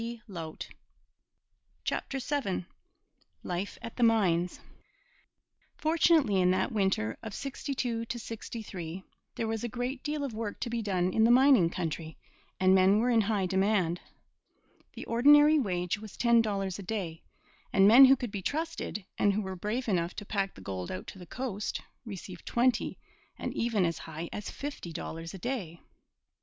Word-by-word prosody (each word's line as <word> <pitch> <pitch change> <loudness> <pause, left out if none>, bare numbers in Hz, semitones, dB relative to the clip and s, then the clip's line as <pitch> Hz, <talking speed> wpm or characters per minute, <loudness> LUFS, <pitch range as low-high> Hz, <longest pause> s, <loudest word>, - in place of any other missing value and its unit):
CHAPTER 275 - -2
VII 255 -9 -2 0.8
LIFE 180 +3 -3
AT 230 - -7
THE - - -3
MINES 180 -7 +2 1.2
Fortunately, 315 - +3
in 180 - +4
that 185 - +1
winter 190 - 0
of 220 -3 -7
'62 255 -4 -3
'63, 210 -7 -6 0.3
there 225 - -2
was 225 0 -2
a - - 0
great 250 +3 -3
deal 295 -1 -2
of 270 -5 -3
work 215 -1 -4
to 235 - -2
be 235 -1 -1
done 185 -3 0
in 220 - +3
the 230 - +5
mining 250 -7 +6
country, 160 -2 -4 0.4
and 185 0 +5
men 190 +2 +5
were 240 +3 +2
in 230 -2 +5
high 205 -2 0
demand. 190 -2 +1 0.9
The - - -8
ordinary 295 +6 +6
wage 180 -5 -1
was 215 -2 -10
ten 235 -1 +5
dollars 195 -3 -2
a - - -5
day, 180 -5 -4 0.5
and 195 0 +6
men 245 +6 +10
who 265 +1 +7
could 245 -5 -5
be 200 -2 -4
trusted, 305 - -3
and 205 - +4
who 210 +2 -1
were 190 -1 -5
brave 215 +7 -3
enough 175 -4 0
to 205 - -6
pack 195 -1 -2
the - - -12
gold 95 -2 -5
out 95 - -5
to 190 - -11
the 180 - -11
coast, 220 -2 -3 0.3
received 190 -4 -8
twenty 240 0 +1 0.4
and - - -4
even 225 -5 +1
as 165 -1 -1
high 160 +1 -6
as 210 - -5
fifty 285 - -6
dollars 165 +1 -6
a - - -6
day. 190 -7 -4
210 Hz, 160 wpm, -30 LUFS, 185-240 Hz, 1.2 s, men